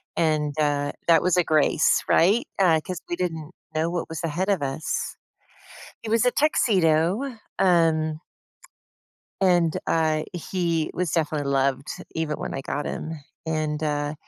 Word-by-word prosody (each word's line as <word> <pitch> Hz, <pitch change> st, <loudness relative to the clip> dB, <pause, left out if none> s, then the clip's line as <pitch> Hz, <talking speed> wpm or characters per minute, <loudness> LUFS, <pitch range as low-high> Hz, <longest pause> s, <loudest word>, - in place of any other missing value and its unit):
and, 155 Hz, -2 st, +1 dB
uh, 145 Hz, -1 st, +1 dB, 0.2 s
that 165 Hz, -2 st, +6 dB
was 180 Hz, -1 st, +2 dB
a 180 Hz, -, +4 dB
grace, 155 Hz, -1 st, +3 dB
right? 200 Hz, +8 st, +4 dB
Uh, 170 Hz, -5 st, +5 dB
'cause 180 Hz, -2 st, -5 dB
we 175 Hz, -, -1 dB
didn't 165 Hz, -3 st, -4 dB, 0.2 s
know 160 Hz, +2 st, 0 dB
what 175 Hz, -1 st, -3 dB
was 160 Hz, 0 st, -5 dB
ahead 170 Hz, +5 st, -1 dB
of 195 Hz, -5 st, +1 dB
us. 140 Hz, +3 st, -3 dB, 0.9 s
It 220 Hz, -, -5 dB
was 230 Hz, +1 st, +3 dB
a 250 Hz, -, +3 dB
tuxedo, 205 Hz, -, +2 dB, 0.2 s
um 160 Hz, -4 st, +2 dB, 1.2 s
and, 175 Hz, -4 st, +3 dB
I 155 Hz, -1 st, +1 dB
he 170 Hz, -2 st, -1 dB
was 180 Hz, -2 st, -1 dB
definitely 150 Hz, -3 st, -1 dB
loved, 135 Hz, 0 st, +1 dB, 0.3 s
even 155 Hz, -2 st, -2 dB
when -, -, -5 dB
I -, -, -3 dB
got 145 Hz, +2 st, -3 dB
him. 160 Hz, -, -4 dB, 0.3 s
And, 155 Hz, -1 st, -1 dB
uh, 145 Hz, -1 st, -1 dB
160 Hz, 145 wpm, -24 LUFS, 150-180 Hz, 1.2 s, that